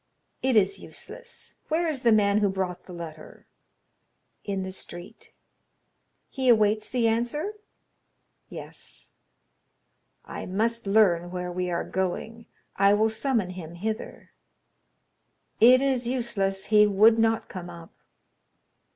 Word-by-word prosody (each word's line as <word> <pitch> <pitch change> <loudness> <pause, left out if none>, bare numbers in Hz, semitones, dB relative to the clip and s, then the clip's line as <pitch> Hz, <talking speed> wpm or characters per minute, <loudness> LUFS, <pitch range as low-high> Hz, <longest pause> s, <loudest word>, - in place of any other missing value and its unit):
"It 260 -2 +1
is 200 -2 +3
useless. - - -10
Where 330 +2 0
is 295 -5 -2
the 235 - +4
man 205 -1 +4
who 205 -1 +2
brought 185 -2 -3
the - - -10
letter?" 165 -3 -10 1.0
"In 195 -2 -3
the 190 - -5
street." 175 -1 -9 1.0
"He 260 -2 -1
awaits 215 -2 +3
the 240 -2 +1
answer?" 240 - -1 1.0
"Yes." - - -10 1.1
"I - - -7
must 225 +4 -1
learn 185 -5 +3
where 180 0 -4
we 180 0 -2
are 170 - -1
going. 220 +5 -4 0.3
I 200 +1 +4
will 220 +1 +2
summon 220 -5 -1
him 170 -2 -9
hither." 215 +5 -5 1.3
"It 250 +3 +7
is 260 -3 0
useless; 215 -6 -1
he 210 0 +7
would 215 +3 +5
not 225 0 +1
come 180 -2 -8
up." 170 -1 -12
210 Hz, 125 wpm, -26 LUFS, 185-235 Hz, 1.3 s, It